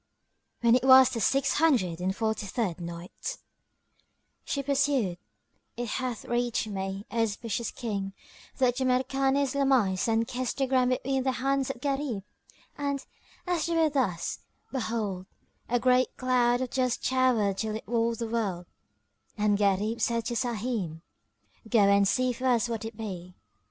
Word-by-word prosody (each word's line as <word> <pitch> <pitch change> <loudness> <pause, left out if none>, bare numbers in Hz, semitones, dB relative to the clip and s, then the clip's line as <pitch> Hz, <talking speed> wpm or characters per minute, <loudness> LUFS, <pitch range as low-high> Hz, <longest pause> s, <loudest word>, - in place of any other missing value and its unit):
When 235 -1 +5
it 250 - +3
was 260 -1 +8
the 230 - -3
Six 275 +5 +2
Hundred 220 - +2
and 190 +1 -1
Forty 220 -2 -1
third 190 -5 -2
Night, 170 - -6 1.1
She 280 - -2
pursued, 270 -9 +1 0.6
It 240 -1 -3
hath 250 -1 -3
reached 240 0 0
me, 195 -1 -4
O 230 - 0
auspicious 225 +1 -2
King, 200 -5 -4 0.4
that 250 -2 +2
Jamrkan 265 +1 +1
islamised 265 -9 +2
and 225 0 +1
kissed 250 -1 -3
the 270 - +2
ground 255 -1 +2
between 265 +1 0
the 260 0 0
hands 270 +1 0
of 260 -3 -5
Gharib; 275 -7 -2 0.5
and, 280 -1 -3 0.4
as 355 -3 0
they 335 - 0
were 320 -2 +3
thus, 225 - -1 0.3
behold, 220 -7 -3 0.4
a 245 +1 +2
great 255 +1 +2
cloud 245 -1 +2
of 255 - -3
dust 255 -2 0
towered 245 -7 +2
till 215 -1 -2
it 220 - -7
walled 230 -1 +1
the 230 - -3
wold 205 -6 -2 0.7
and 210 -1 +2
Gharib 205 +3 +1
said 230 -1 0
to 240 - -2
Sahim, 225 -9 -2 0.7
"Go 225 -2 +4
and 200 0 +5
see 255 +4 +1
for 255 +2 -3
us 240 -2 +3
what 225 -2 -4
it 225 -1 -7
be." 180 -5 -7
235 Hz, 155 wpm, -28 LUFS, 205-260 Hz, 1.1 s, was